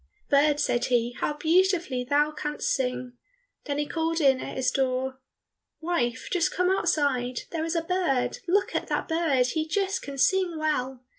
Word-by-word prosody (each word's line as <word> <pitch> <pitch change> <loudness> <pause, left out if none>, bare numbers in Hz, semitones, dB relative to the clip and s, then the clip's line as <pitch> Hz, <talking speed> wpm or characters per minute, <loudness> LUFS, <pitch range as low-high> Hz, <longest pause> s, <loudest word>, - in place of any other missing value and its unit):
"Bird," 290 +1 +4
said 240 -4 +1
he, 240 -1 +1
"how 300 - 0
beautifully 340 -5 +2
thou 290 +3 +2
canst 300 0 -2
sing!" 250 -1 -2 0.5
Then 285 -1 -2
he 295 - 0
called 325 +2 -1
in 270 -4 +4
at - - -6
his 255 -1 +1
door, 260 0 -1 0.6
"Wife, 315 -9 -1
just 355 -3 +2
come 360 +1 +1
outside, 265 -9 0
there 325 -2 -2
is 330 +1 -2
a 335 - 0
bird, 330 -8 0
look 390 +3 +1
at - - -2
that - - -2
bird, 320 -6 +2
he 310 +5 -1
just 390 +3 -1
can 280 -1 -7
sing 350 +5 +2
well." 265 -5 -2
295 Hz, 170 wpm, -26 LUFS, 255-335 Hz, 0.6 s, Bird